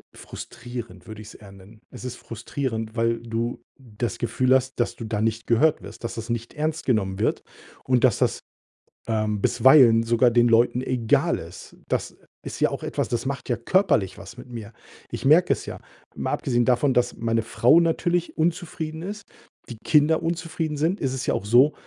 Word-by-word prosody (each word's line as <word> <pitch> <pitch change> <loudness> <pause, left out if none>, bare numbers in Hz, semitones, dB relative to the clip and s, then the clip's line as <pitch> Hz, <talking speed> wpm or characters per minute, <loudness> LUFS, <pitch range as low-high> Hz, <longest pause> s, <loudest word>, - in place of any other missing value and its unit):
Frustrierend 120 -6 -9
würde 110 -1 -9
ich's 110 +1 -11
eher 100 -2 -14
nennen. 100 +3 -16
Es 125 0 -10
ist 125 - -5
frustrierend, 115 -1 -5
weil 115 0 +1
du 115 +1 -3 0.2
das 120 -4 -5
Gefühl 130 +3 +2
hast, 130 0 -1
dass 120 - 0
du - - -8
da 105 -1 -2
nicht 110 +1 -1
gehört 150 +7 +3
wirst, - - -12
dass 115 - -4
das 115 +1 -7
nicht 115 0 -4
ernst 155 +1 -3
genommen 100 -6 0
wird - - 0 0.4
und 125 -2 +1
dass 120 - +3
das, - - +1 0.7
ähm, 110 -2 -1
bisweilen 125 -4 +6
sogar 120 +1 +3
den 120 0 +4
Leuten 120 +2 +3
egal 125 -4 +1
ist. - - -11
Das - - -2 0.3
ist - - -7
ja - - +4
auch - - -5
etwas, - - -2
das 120 0 -2
macht 140 0 -4
ja 120 - +1
körperlich 120 - +1
was 100 +5 -11
mit 125 - -11
mir. 115 -2 -8 0.4
Ich - - -5
merke 155 +6 +5
es - - -7
ja. - - -6 0.4
Mal - - -3
abgesehen 120 -2 0
davon, 130 +2 +2
dass 125 0 +2
meine 115 0 0
Frau 125 +7 +4
natürlich 175 +1 0
unzufrieden 160 -1 -2
ist, 200 +2 -7 0.4
die 120 - -7
Kinder 160 +2 +3
unzufrieden 160 -2 -3
sind, 165 +7 0
ist 135 -3 -1
es 130 -2 -4
ja - - +2
auch - - -4
so, 125 +8 +5
120 Hz, 190 wpm, -24 LUFS, 115-145 Hz, 0.7 s, bisweilen